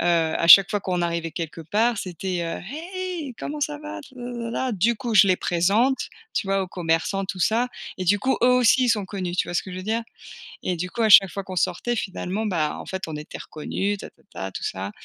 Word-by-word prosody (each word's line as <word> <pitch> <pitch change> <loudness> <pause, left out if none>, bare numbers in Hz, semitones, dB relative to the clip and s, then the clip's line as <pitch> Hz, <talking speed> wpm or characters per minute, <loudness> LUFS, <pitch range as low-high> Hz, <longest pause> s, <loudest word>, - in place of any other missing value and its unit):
heu, - - -1
à 165 -1 +2
chaque 195 +4 +10
fois 205 - 0
qu'on 180 -2 -1
arrivait 170 -1 -2
quelque 165 0 -5
part, 215 +8 +1
c'était, 180 -1 -3
heu: 165 0 -4 0.3
«Hey, 360 -8 -4
comment 300 +1 -5
ça 295 0 -2
va? 305 +1 -7
Lalala» 245 0 -4
du 220 +4 +2
coup 235 -1 -3
je 200 -1 +8
les 185 -2 +3
présente, 200 +12 +1 0.2
tu 205 - -1
vois, 195 0 +1
aux 185 - -6
commerçants, 175 +3 -1
tout 185 -1 -5
ça 230 +7 +2 0.3
et 185 - -2
du 205 +3 +3
coup, 265 +4 +1
eux - - +6
aussi, 250 +1 +5
ils - - +1
sont 215 -4 +2
connus, 185 -3 -4
tu - - 0
vois - - -5
ce - - +1
que 190 - -8
je - - -6
veux - - -6
dire? 220 +4 -1 0.6
Et 180 - -1
du 180 +2 -3
coup, 235 - -4
à 220 - +3
chaque 195 -2 +9
fois 195 +3 -5
qu'on 185 -1 -7
sortait 240 +8 0
finalement, 195 +2 -3
ben, 160 -6 0
en - - -8
fait, 190 0 -5
on 160 - -5
était 150 - -8
reconnus 200 +6 -3
tatata, 95 - -8
tout - - -7
ça 95 +1 -4
195 Hz, 235 wpm, -24 LUFS, 175-235 Hz, 0.6 s, chaque